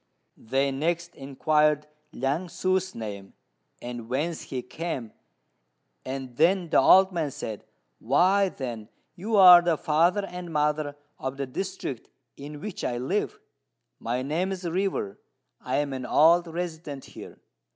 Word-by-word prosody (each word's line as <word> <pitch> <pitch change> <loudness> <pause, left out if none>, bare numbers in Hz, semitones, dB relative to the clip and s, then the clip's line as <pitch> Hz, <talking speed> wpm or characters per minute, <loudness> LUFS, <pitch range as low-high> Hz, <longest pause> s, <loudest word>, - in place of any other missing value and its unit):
They 135 +4 -1
next 170 +5 -2
inquired 150 +2 +1 0.3
Liang 145 +6 -2
ssŭ's 185 +1 -1
name, 100 -3 -7 0.5
and 120 -2 -7
whence 155 +6 -2
he 125 -2 -4
came, 135 -7 -5 0.9
and 130 -2 -6
then 175 +1 +2
the - - +5
old 190 +7 +6
man 165 -5 -1
said, 125 -7 -7 0.3
"Why, 195 +2 +3
then, 120 -8 -6 0.3
you 210 +5 -2
are 180 -3 +10
the 170 -2 +1
father 170 +8 +2
and 180 -2 -8
mother 150 -1 0 0.2
of 130 +1 -4
the 140 - -2
district 160 - -5 0.3
in 145 +1 -9
which 210 -3 -6
I 120 - -1
live. 175 +12 -2 0.6
My 125 +2 -2
name 165 +7 -1
is 185 -2 -4
River: 175 - -2 0.4
I 125 - -2
am 140 -1 0
an 130 -1 -5
old 170 +3 +5
resident 160 -4 -5
here. - - -12
150 Hz, 140 wpm, -26 LUFS, 130-175 Hz, 0.9 s, are